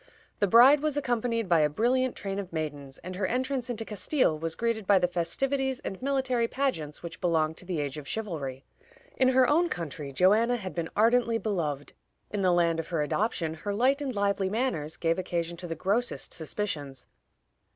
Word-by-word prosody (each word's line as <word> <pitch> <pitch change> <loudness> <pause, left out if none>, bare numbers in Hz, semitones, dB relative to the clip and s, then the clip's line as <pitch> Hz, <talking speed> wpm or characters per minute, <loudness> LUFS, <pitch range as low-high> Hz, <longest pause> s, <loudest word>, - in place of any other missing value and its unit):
The 205 - +3
bride 250 +8 +7
was 300 0 -1
accompanied 235 -4 0
by 170 -2 +4
a 150 -1 +3
brilliant 245 - +1
train 195 0 -4
of 190 -3 -6
maidens, 145 -4 -5
and 180 +1 -6
her 185 0 -1
entrance 255 0 -2
into 225 -2 -3
Castile 215 - +1
was 160 +1 -3
greeted 230 -3 -1
by 200 - +6
the 180 -1 +2
festivities 265 +10 0
and 190 - -6
military 260 -3 +1
pageants 200 - -2
which 170 - -8
belonged 160 -3 +1
to - - -9
the 175 -3 -2
age 145 0 -3
of 145 - -11
chivalry. 150 -11 -4 0.5
In 260 - +3
her 260 -1 +5
own 335 +5 +3
country 150 -4 -5
Joanna 210 - +4
had 190 -6 -5
been 170 -1 -3
ardently 230 +1 +3
beloved; 160 -11 -3 0.4
in 205 - -2
the 185 - +3
land 170 -2 +2
of 165 - -4
her 165 -4 0
adoption 165 -1 -1
her 200 +6 -4
light 265 +6 +2
and 265 -4 -3
lively 200 -1 +1
manners 190 - -2
gave 165 +1 0
occasion 170 -2 -2
to 175 - -6
the 165 - -4
grossest 205 +9 -1
suspicions. 150 -6 -4
195 Hz, 190 wpm, -28 LUFS, 165-245 Hz, 0.5 s, bride